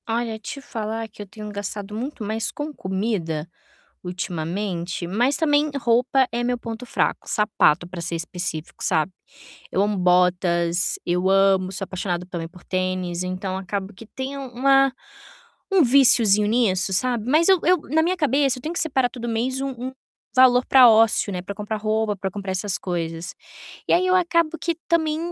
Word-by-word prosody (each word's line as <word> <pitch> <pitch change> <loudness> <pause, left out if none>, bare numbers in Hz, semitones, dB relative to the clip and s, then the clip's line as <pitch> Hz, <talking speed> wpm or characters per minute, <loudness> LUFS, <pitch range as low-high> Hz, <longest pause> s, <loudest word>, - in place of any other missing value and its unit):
Olha, 225 -1 -2
te 250 +6 -7
falar 225 -3 -4
que 215 - -13
eu 205 - -8
tenho 210 +1 -9
gastado 205 0 -5
muito 245 +1 -5
mais 220 +2 -2
com 300 +1 -5
comida, 185 - -3 0.6
ultimamente, 175 0 -4
mas 240 +10 +1
também 300 -1 +2
roupa 250 +2 +2
é 240 +1 -2
meu 245 0 0
ponto 230 +1 -7
fraco. 245 - -1
Sapato 200 -5 +2
para 180 -1 -7
ser 170 0 -3
específico, 165 -1 -5
sabe. 160 +3 +1 0.6
Eu 195 - +1
amo 205 0 0
botas, 180 -1 +2
eu 180 +2 +1
amo, 195 -1 +3
sou 195 +1 -4
apaixonada 180 -2 -3
também 170 -3 -5
por 175 +1 -17
tênis, 185 -1 -2
então 185 +1 -4
acabo 195 +1 -4
que 225 +4 -13
tem 265 +5 -6
um 270 -1 -6
uma 270 +1 +4 0.8
um 380 -3 +5
víciozinho 235 -6 +5
nisso, 205 -5 +2
sabe. 235 +3 0
Mas 320 +5 +4
eu 380 -1 +6
eu 365 +1 +4
na 320 +2 +3
minha 360 +3 +1
cabeça 275 -4 +1
eu - - -14
tenho 315 - -3
que - - -1
separar 265 -5 +1
todo 240 -1 -7
mês 245 +4 -1
um 275 - -2
um 255 0 -6 0.4
valor 255 -1 +6
para 255 -2 +8
ócio, 220 -2 +3
né, 180 - -3
para 200 +2 -6
comprar 210 +1 -4
roupa, 215 0 0
para 190 0 -3
comprar 195 0 -5
essas 190 0 -1
coisas. 170 -1 -4 0.5
E - - +3
aí 365 +2 +3
eu 370 - +3
acabo 335 -2 +1
que 335 -1 -1
também 315 -2 +1
215 Hz, 180 wpm, -23 LUFS, 185-255 Hz, 0.8 s, para